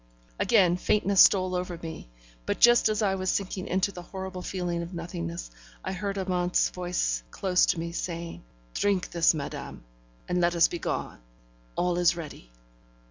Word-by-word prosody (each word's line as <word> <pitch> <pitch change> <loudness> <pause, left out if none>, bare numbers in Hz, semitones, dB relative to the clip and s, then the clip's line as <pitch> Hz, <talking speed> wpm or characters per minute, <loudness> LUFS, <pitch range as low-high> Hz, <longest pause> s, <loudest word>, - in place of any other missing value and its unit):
Again 185 -6 +4
faintness 200 +1 +3
stole 185 -2 +5
over 180 -1 -3
me; 160 - -8 0.4
but - - -1
just 240 -2 +6
as 215 0 0
I 195 -2 +2
was 185 -1 -2
sinking 190 -1 -2
into 190 +2 +1
the 180 - -8
horrible 190 0 -7
feeling 175 -2 -3
of 170 +2 -7
nothingness, 85 - -5 0.3
I 190 - -2
heard 200 +1 -3
Amante's 180 -2 +1
voice 175 - -1
close 180 - +2
to 175 - +1
me, 170 0 -4
saying: 170 -1 -5 0.3
'Drink 200 -3 0
this, 170 -1 +4
madame, 140 - -6 0.4
and 180 0 0
let 175 0 +2
us 170 - +6
begone. 175 - -4 0.6
All 180 0 0
is 175 -1 +4
ready.' 150 - -9
180 Hz, 160 wpm, -27 LUFS, 170-190 Hz, 0.6 s, just